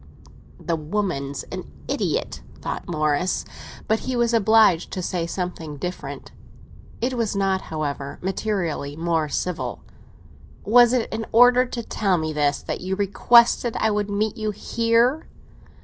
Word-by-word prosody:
"The 170 - -1
woman's 155 -4 -3
an - - -7 0.2
idiot," - - -2 0.2
thought - - -5
Morris; 155 +2 0 0.4
but 220 0 +2
he 260 - -3
was 235 -1 +1
obliged 220 -5 +4
to 185 - -3
say 170 -2 -2
something 170 -4 -5
different. 180 +5 -6 0.7
It 250 +2 0
was 230 -4 -1
not, 195 -1 +1
however, 145 -3 -4
materially 180 -7 -2
more 165 -1 0
civil. 180 +3 -3 0.8
"Was 240 +2 +6
it 250 -3 +1
in 225 0 -3
order 245 +2 +6
to 240 -1 -5
tell 195 -4 0
me 155 -1 -2
this 145 -1 0
that - - -4
you 185 +1 -2
requested 235 +4 +4
I 220 - +2
would 205 0 -1
meet 210 +1 -1
you 215 -1 -2
here?" 230 +6 +1
195 Hz, 140 wpm, -23 LUFS, 165-225 Hz, 0.8 s, Was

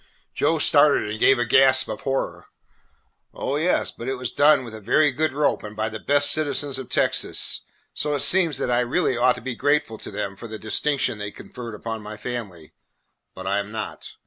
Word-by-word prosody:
Joe - - +1
started - - +4
and 110 - -5
gave 135 - +5
a 120 - 0
gasp 130 +2 +5
of - - -6
horror. 135 0 -3 0.9
"Oh, 140 - -2
yes, 170 +4 +1
but 115 - -9
it 135 - -1
was 125 -2 -4
done 145 -2 +4
with 115 -3 -9
a 110 - -9
very 145 +8 +3
good 155 +5 -1
rope 145 +2 0
and 105 0 -9
by 110 +1 -2
the 110 0 -7
best 145 +3 +3
citizens 145 -3 0
of 130 - -8
Texas, - - +2 0.3
so 150 -1 -1
it 140 - 0
seems 165 0 +4
that 125 - -2
I 120 - +2
really 125 +3 0
ought 125 +1 +3
to 125 - -10
be 130 +3 -4
very 120 - -7 0.2
grateful 115 -8 -9
to - - -8
them 100 -1 -5
for 115 - -10
the 110 0 -7
distinction 110 +2 0
they 105 0 -4
conferred 115 +1 -9
upon 110 +1 -6
my 105 +1 -9
family, 105 -9 -7 0.6
but 95 - -9
I 100 +1 0
am 100 +1 -6
not. 110 -1 -7
125 Hz, 215 wpm, -23 LUFS, 110-140 Hz, 0.9 s, gave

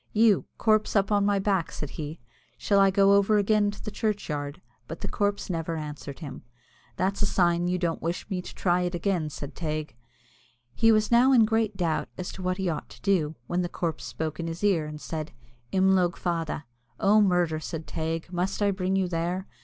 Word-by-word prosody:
"You 215 -2 +4
corpse, 215 -1 +2
up 200 0 +2
on 205 -1 +3
my 205 -1 +3
back," 195 -3 0
said 150 - -5
he, 155 +1 -6 0.4
"shall 200 -1 +2
I 195 0 +6
go 195 +1 +5
over 200 +1 +4
again 205 0 +3
to 205 - -8
the 215 - -5
churchyard?" 155 -10 -2 0.3
but 165 - -7
the - - -3
corpse 205 0 -1
never 165 -2 -2
answered 150 -1 -7
him. 140 -4 -7 0.6
"That's 190 +2 0
a 205 - +3
sign 175 -2 +2
you 180 +1 +1
don't 170 -2 -1
wish 170 +2 -3
me 190 -3 -2
to - - -10
try 180 -1 +2
it 180 0 -1
again," 175 -3 0
said 145 0 -7
Teig. 155 -4 -4 0.8
He 225 0 +4
was 215 0 +2
now 250 +3 +6
in 230 -3 +6
great 220 -2 0
doubt 165 -4 0
as 185 - -4
to - - -9
what 185 0 -1
he 190 -1 -1
ought 165 - -3
to - - -14
do, 165 -6 +1
when 175 +7 -1
the 175 - -2
corpse 165 -3 -3
spoke 155 0 -4
in 165 - -3
his 165 +4 -6
ear, 175 -7 +2
and 150 0 -7
said 155 0 -5 0.4
"Imlogue 190 -2 +3
Fada." 165 -3 -2 0.3
"Oh, 210 +2 +5
murder!" 175 -5 +2
said 160 0 -5
Teig, 165 +2 -4
"must 180 +2 -1
I 205 -1 +3
bring 190 0 -1
you 190 -1 +1
there? 175 +2 -2
180 Hz, 210 wpm, -27 LUFS, 165-200 Hz, 0.8 s, I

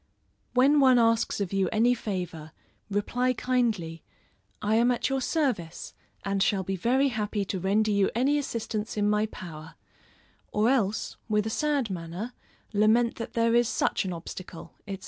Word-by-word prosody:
When 275 +4 +5
one 260 -2 +6
asks 230 -2 +2
of 200 -2 -2
you 195 -2 +1
any 230 +3 +3
favor, 180 -8 -5 0.4
reply 245 +5 0
kindly, 225 -11 -1 0.6
"I 210 +1 0
am 235 +2 +4
at 245 +2 0
your 270 0 0
service, 245 - -2 0.3
and 195 0 0
shall 190 -1 +2
be 195 +1 -2
very 255 +9 +2
happy 210 -3 -2
to 190 0 -3
render 210 +4 +2
you 200 -1 +3
any 275 +5 +2
assistance 225 -5 -4
in 205 0 +2
my 210 +1 +2
power;" 160 -5 -10 0.8
or 215 +4 +2
else, 220 -6 0
with 210 -1 +2
a 220 - -2
sad 285 -4 0
manner, 180 +7 -5 0.4
lament 220 +3 +3
that 230 - -6
there 230 0 +2
is 240 -1 +3
such - - 0
an 190 - -3
obstacle, 170 0 -8
&c. 195 -1 -4
215 Hz, 165 wpm, -27 LUFS, 195-245 Hz, 0.8 s, one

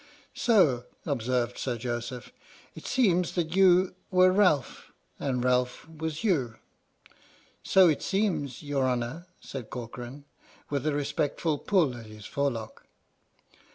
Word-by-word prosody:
" - - -37
So," 155 - +4 0.2
observed 125 -3 -1
Sir 125 -3 -2
Joseph, 120 +1 -5 0.4
"it - - -10
seems 180 -9 +2
that 170 -1 -2
you 185 -1 +5 0.2
were 185 -1 +5
Ralph 180 - +1 0.3
and 125 -3 -1
Ralph 125 +2 0
was 160 0 -5
you." 135 - +1 0.5
" - - -29 0.3
So 190 -1 +6
it 155 -4 +1
seems, 190 - -1
your 140 -3 0
Honour," 125 +8 -3
said 130 -5 -7
Corcoran, 125 +3 -8 0.5
with 140 0 -1
a 155 - +1
respectful 145 +1 -1
pull 165 -11 +2
at 115 -2 -10
his 110 -1 -12
forelock. 120 -6 -3
140 Hz, 130 wpm, -28 LUFS, 125-175 Hz, 0.5 s, So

